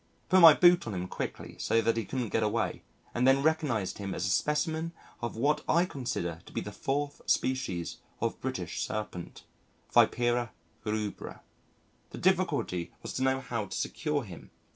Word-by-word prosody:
Put 185 0 +6
my 165 -3 +11
boot 175 -5 +5
on 105 - -3
him 90 0 -3
quickly - - -5
so 115 - +2
that 115 0 +2
he 115 -2 -2
couldn't 125 -1 -3
get 115 - +1
away 110 +1 0 0.3
and 125 +2 +2
then 135 +1 +5
recognised 145 - 0
him 100 -2 -4
as 90 - -2
a 95 - +1
specimen 160 - 0 0.3
of 120 -2 -3
what 145 +7 +1
I 170 +2 +4
consider 120 - -3
to - - -12
be - - -2
the - - -6
fourth 145 +1 -2
species 95 -10 0 0.2
of - - -2
British - - -3
Serpent 105 -5 -5 0.5
Vipera 120 -1 +3 0.3
rubra. 105 -1 -3 0.7
The - - -9
difficulty 170 - +1
was - - -5
to - - -3
know 130 0 +2
how 115 -5 -3
to - - -5
secure 150 -1 -1
him. 90 -6 -11
120 Hz, 170 wpm, -30 LUFS, 105-150 Hz, 0.7 s, my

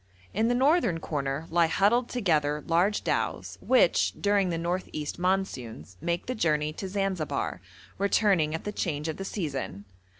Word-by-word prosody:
In 220 +3 +2
the 245 - +2
northern 265 - +3
corner 140 -1 -3
lie 170 0 +4
huddled 215 +9 +2
together 150 -10 +1
large 180 +5 +2
dhows, - - -2
which, - - +3
during 200 -2 +2
the 170 - -1
north 175 +3 -2
east 150 +2 -4
monsoons, 130 - -2
make 170 +1 -1
the 255 - -2
journey 155 -7 +1
to 190 - -5
Zanzibar, 190 -5 -2 0.4
returning 195 -6 +2
at 160 - -5
the 210 - -3
change 155 -6 -2
of 160 - -3
the 195 - -4
season. 135 - -4
175 Hz, 160 wpm, -28 LUFS, 150-200 Hz, 0.4 s, lie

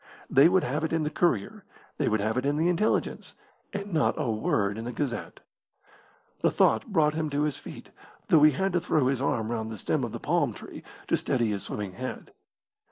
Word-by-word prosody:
They 140 +5 +7
would 185 0 +3
have 150 +5 -2
it 160 - -1
in 165 -1 +1
the 150 - -2
Courier; 125 - 0 0.4
they - - +1
would 110 -1 +1
have 110 +2 0
it 130 - 0
in 145 +1 0
the 165 +3 +2
Intelligence, 180 +5 0 0.4
and 200 -1 -5
not 155 - +2
a 115 - 0
word 105 -1 0
in 115 - -5
the 120 - -3
Gazette. 125 0 -4 1.0
The - - +3
thought 110 - +2
brought 160 -8 +2
him 155 -1 -2
to 145 +1 0
his 150 -3 -1
feet, - - -11 0.4
though 155 - +6
he 150 0 +7
had 190 +6 -1
to 175 - +2
throw 155 -5 +1
his 135 -2 -1
arm 115 -4 0
round 110 -1 -3
the 110 - -6
stem - - -1
of - - -3
the - - -6
palm - - 0
tree - - -10 0.3
to - - +3
steady 120 -4 0
his 100 -1 -2
swimming 105 -2 -4
head. 130 +6 -7
140 Hz, 220 wpm, -27 LUFS, 110-160 Hz, 1.0 s, They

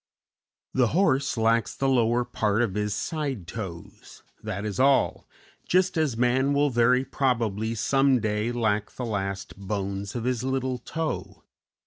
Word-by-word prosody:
The 125 -2 +3
horse 140 -9 +2
lacks 115 +1 +2
the 135 - 0
lower 120 -2 +2
part 110 -2 0
of 105 -6 -1
his 105 -1 -1
side 140 - -3
toes, 90 -3 -9 0.2
that 100 +2 -4
is 105 +2 -4
all, 135 +1 +3 0.4
just 185 +1 +2
as 155 -8 0
man 130 +3 +2
will 145 0 +2
very 125 +2 +3
probably 115 -5 0
some 135 +3 +3
day 105 +1 -1
lack 110 -3 0
the 125 - -5
last 100 -3 -3
bones 100 0 -4
of 120 - -3
his 125 -1 0
little 130 -1 -1
toe. 160 +6 -4
120 Hz, 145 wpm, -26 LUFS, 105-130 Hz, 0.4 s, The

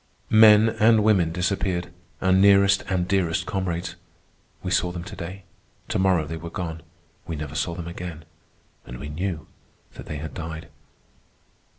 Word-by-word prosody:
Men 110 0 +7
and 110 -1 +4
women 95 -6 +3
disappeared, 90 0 -1 0.3
our 95 - +3
nearest 100 +1 +5
and 90 -2 0
dearest 90 -4 0
comrades. 90 -2 -3 0.7
We 90 - -3
saw 90 -1 +1
them 85 -1 -6
to 95 - -9
day. 95 +2 -7 0.5
To - - 0
morrow 95 -4 +2
they 80 +2 -5
were 85 +1 -7
gone; 80 -2 -5 0.5
we 85 - -3
never 75 0 -6
saw 80 +3 -2
them 85 -1 -6
again, 85 -2 -7 0.6
and - - -9
we 75 - -7
knew 85 +1 -4 0.5
that - - -11
they 75 - -5
had 75 0 -7
died. 80 -1 -7
90 Hz, 160 wpm, -24 LUFS, 80-95 Hz, 0.7 s, Men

